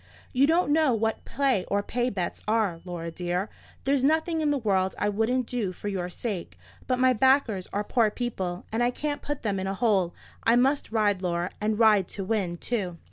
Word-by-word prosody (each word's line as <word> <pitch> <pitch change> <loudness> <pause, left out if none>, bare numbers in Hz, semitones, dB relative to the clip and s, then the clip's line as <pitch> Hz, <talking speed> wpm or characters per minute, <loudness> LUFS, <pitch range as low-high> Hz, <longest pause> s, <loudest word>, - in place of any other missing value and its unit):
You 270 +2 +4
don't 325 -2 +3
know 305 -6 +3
what 225 0 -1
play 265 -9 +1
or 200 0 0
pay 245 +3 -1
bets 185 -6 -3
are, 210 -6 +1
Laura 170 -2 -5
dear. 180 +4 -2 0.3
There's 275 -1 +1
nothing 320 +3 +2
in 300 - +2
the 290 - +2
world 190 -6 +1
I 205 - +1
wouldn't 225 +5 +1
do 225 -6 -2
for 205 +3 -5
your 180 -3 -3
sake; 180 - -5 0.3
but 255 - +1
my 255 0 +4
backers 250 -6 +2
are 205 - -1
poor 225 0 +2
people, 190 -6 -4
and 225 +2 0
I 240 - +3
can't 290 +3 -3
put 290 -1 -4
them 200 -3 0
in 190 - -3
a 195 - -2
hole. 195 -5 +1 0.3
I 230 - +4
must 270 +2 +2
ride, 205 -4 +2
Laura, 175 -1 -1
and 215 0 0
ride 210 -5 +5
to 195 - -2
win, 190 -4 -1
too." 185 -5 -3
215 Hz, 205 wpm, -27 LUFS, 190-255 Hz, 0.3 s, ride